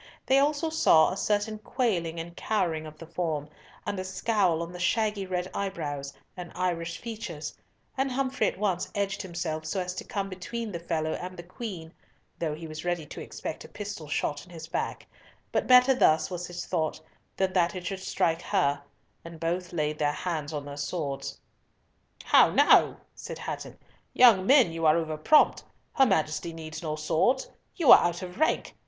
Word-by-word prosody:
They 265 Hz, +1 st, +4 dB
also 295 Hz, +3 st, +1 dB
saw 160 Hz, -, +5 dB
a -, -, -3 dB
certain 210 Hz, +2 st, 0 dB
quailing 180 Hz, -9 st, -1 dB
and 170 Hz, +1 st, -7 dB
cowering 165 Hz, -8 st, -1 dB
of 155 Hz, 0 st, -12 dB
the 165 Hz, -, -10 dB
form, 160 Hz, -3 st, -2 dB, 0.4 s
and 200 Hz, -, -2 dB
a -, -, -2 dB
scowl 185 Hz, -3 st, +1 dB
on 170 Hz, -, -7 dB
the 180 Hz, -, -9 dB
shaggy 210 Hz, +2 st, 0 dB
red 180 Hz, -1 st, -2 dB
eyebrows, 150 Hz, -8 st, -3 dB, 0.2 s
and 180 Hz, -1 st, -8 dB
Irish 170 Hz, -2 st, -2 dB
features, 210 Hz, -10 st, -6 dB, 0.4 s
and 270 Hz, 0 st, 0 dB
Humfrey 260 Hz, -4 st, 0 dB
at -, -, -3 dB
once 190 Hz, -3 st, -1 dB
edged 200 Hz, -1 st, -1 dB
himself 170 Hz, -4 st, -4 dB
so 190 Hz, -, -1 dB
as 180 Hz, 0 st, -3 dB
to -, -, -6 dB
come 200 Hz, -1 st, -3 dB
between 210 Hz, +4 st, -5 dB
the 170 Hz, -, -4 dB
fellow 160 Hz, -2 st, -2 dB
and 185 Hz, +1 st, -6 dB
the 175 Hz, -, -7 dB
Queen, 175 Hz, -3 st, -7 dB, 0.5 s
though 155 Hz, -3 st, -1 dB
he 165 Hz, +2 st, -8 dB
was 155 Hz, 0 st, -7 dB
ready 175 Hz, -3 st, -1 dB
to -, -, -8 dB
expect -, -, -6 dB
a -, -, -10 dB
pistol 200 Hz, -7 st, -7 dB
shot 145 Hz, 0 st, -2 dB
in 180 Hz, -, -17 dB
his 165 Hz, -2 st, -9 dB
back, 165 Hz, -, -3 dB, 0.5 s
but -, -, 0 dB
better 250 Hz, +1 st, +7 dB
thus, 155 Hz, -8 st, +3 dB
was 180 Hz, 0 st, -4 dB
his 175 Hz, 0 st, -6 dB
thought, 160 Hz, -4 st, -1 dB, 0.4 s
than 190 Hz, -1 st, +1 dB
that 180 Hz, +1 st, +2 dB
it 180 Hz, -1 st, -6 dB
should 195 Hz, +1 st, -3 dB
strike 170 Hz, -3 st, 0 dB
her,—and 165 Hz, -1 st, -3 dB
both 175 Hz, +2 st, -2 dB
laid 150 Hz, -3 st, -1 dB
their 145 Hz, -1 st, +2 dB
hands 155 Hz, -3 st, -3 dB
on 145 Hz, -2 st, -4 dB
their 145 Hz, 0 st, -7 dB
swords. 145 Hz, -2 st, -4 dB, 0.8 s
"How -, -, +6 dB
now!" -, -, +5 dB, 0.2 s
said -, -, -8 dB
Hatton, -, -, -6 dB, 0.4 s
"young 215 Hz, -7 st, +6 dB
men, 260 Hz, -, +6 dB
you 165 Hz, -1 st, 0 dB
are 155 Hz, +2 st, +5 dB
over 160 Hz, -2 st, -2 dB
prompt. 225 Hz, -, +4 dB, 0.3 s
Her 270 Hz, -2 st, +5 dB
Majesty 165 Hz, -3 st, 0 dB
needs 160 Hz, -1 st, -7 dB
no 155 Hz, -2 st, -2 dB
swords. 160 Hz, -, +1 dB, 0.2 s
You 325 Hz, -8 st, +5 dB
are -, -, +11 dB
out 175 Hz, +1 st, -1 dB
of 180 Hz, +5 st, -8 dB
rank. 315 Hz, -, +1 dB
175 Hz, 185 wpm, -28 LUFS, 160-200 Hz, 0.8 s, are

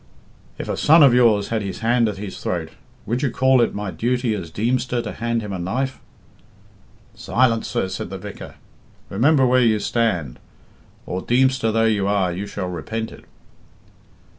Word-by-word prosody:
'If -, -, -6 dB
a -, -, -2 dB
son 160 Hz, +1 st, +6 dB
of 135 Hz, -4 st, +6 dB
yours 115 Hz, -5 st, +3 dB
had 115 Hz, -1 st, -1 dB
his 100 Hz, -1 st, -6 dB
hand 115 Hz, 0 st, +2 dB
at 100 Hz, -, -6 dB
his 100 Hz, -1 st, -7 dB
throat, 80 Hz, -3 st, -3 dB, 0.4 s
would 120 Hz, +5 st, -1 dB
you 140 Hz, -, +1 dB
call 130 Hz, +1 st, +3 dB
it 115 Hz, -, 0 dB
my 105 Hz, -2 st, -4 dB
duty 125 Hz, +1 st, -1 dB
as 90 Hz, -6 st, -5 dB
Deemster 120 Hz, +6 st, -1 dB
to -, -, -4 dB
hand 115 Hz, 0 st, -2 dB
him 105 Hz, -2 st, -5 dB
a 95 Hz, -, -4 dB
knife.' 130 Hz, +9 st, -2 dB, 1.1 s
'Silence, 115 Hz, -2 st, +1 dB
sir,' -, -, -1 dB
said 95 Hz, -1 st, -5 dB
the 95 Hz, -, -6 dB
vicar. 100 Hz, +1 st, -9 dB, 0.6 s
Remember 135 Hz, +7 st, +3 dB
where 125 Hz, 0 st, +4 dB
you 115 Hz, -3 st, +3 dB
stand, 95 Hz, -, -1 dB, 0.7 s
or, 90 Hz, -, -4 dB
Deemster 130 Hz, -1 st, +2 dB
though 115 Hz, +1 st, +2 dB
you 105 Hz, -3 st, +1 dB
are, 100 Hz, -3 st, +1 dB
you 100 Hz, +3 st, -5 dB
shall 100 Hz, -2 st, -4 dB
repent 110 Hz, +6 st, -4 dB
it.' -, -, -14 dB
115 Hz, 175 wpm, -21 LUFS, 100-125 Hz, 1.1 s, son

